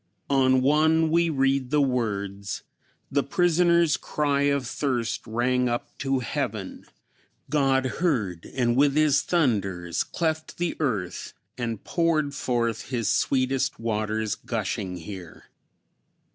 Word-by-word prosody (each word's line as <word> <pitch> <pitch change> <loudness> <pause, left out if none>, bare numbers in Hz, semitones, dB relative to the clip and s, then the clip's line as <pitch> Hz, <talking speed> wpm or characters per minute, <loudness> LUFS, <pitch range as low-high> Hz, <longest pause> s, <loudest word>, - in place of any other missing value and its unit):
On 130 -1 +4
one 160 +3 +3
we 170 0 +3
read 135 -3 +1
these 150 - +2
words: 100 -7 -1 0.5
"The 140 - +2
prisoner's 170 -2 +3
cry 145 -2 0
of 140 -2 0
thirst 120 -3 -2
rang 125 +2 +1
up 120 0 -4
to 135 -1 0
heaven. 115 - -4 0.7
God 135 -3 +2
heard 120 - -1
and 120 -2 +2
with 140 +1 +3
his 150 -2 +4
thunders 100 - 0
cleft 160 -2 -2
the 175 -1 -1
earth, 105 - -2 0.2
and 115 -4 -4
poured 155 -4 +1
forth 120 -5 -1
his 120 -4 -1
sweetest 130 0 +1
waters 110 -1 -1
gushing 100 -5 -3
here." 90 -1 -10
130 Hz, 115 wpm, -25 LUFS, 110-150 Hz, 0.7 s, On